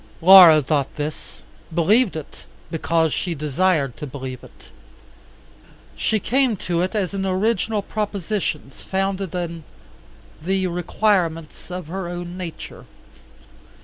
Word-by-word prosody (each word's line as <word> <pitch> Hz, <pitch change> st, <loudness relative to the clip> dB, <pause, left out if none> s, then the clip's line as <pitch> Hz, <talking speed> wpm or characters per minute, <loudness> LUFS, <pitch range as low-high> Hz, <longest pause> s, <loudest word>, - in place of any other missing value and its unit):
Laura 170 Hz, -4 st, +9 dB
thought 140 Hz, -1 st, -1 dB
this, 150 Hz, +1 st, -6 dB, 0.3 s
believed 195 Hz, +7 st, +2 dB
it; 155 Hz, -2 st, -9 dB, 0.3 s
because 165 Hz, -1 st, +1 dB
she 175 Hz, -2 st, -2 dB
desired 150 Hz, -2 st, 0 dB
to 150 Hz, -, -6 dB
believe 130 Hz, -2 st, -7 dB
it. -, -, -17 dB, 1.3 s
She 215 Hz, -, 0 dB
came 250 Hz, +1 st, +1 dB
to 175 Hz, -2 st, -1 dB
it 185 Hz, +4 st, -2 dB
as 200 Hz, -3 st, -1 dB
an 195 Hz, -1 st, -2 dB
original 205 Hz, +2 st, 0 dB
proposition 200 Hz, -8 st, -3 dB
founded 195 Hz, +2 st, -3 dB
on 170 Hz, -2 st, -4 dB, 0.8 s
the 190 Hz, +3 st, 0 dB
requirements 175 Hz, -3 st, -1 dB
of 180 Hz, -1 st, -6 dB
her 180 Hz, +3 st, -5 dB
own 175 Hz, 0 st, -6 dB
nature. 180 Hz, -3 st, -8 dB
175 Hz, 115 wpm, -22 LUFS, 160-195 Hz, 1.3 s, Laura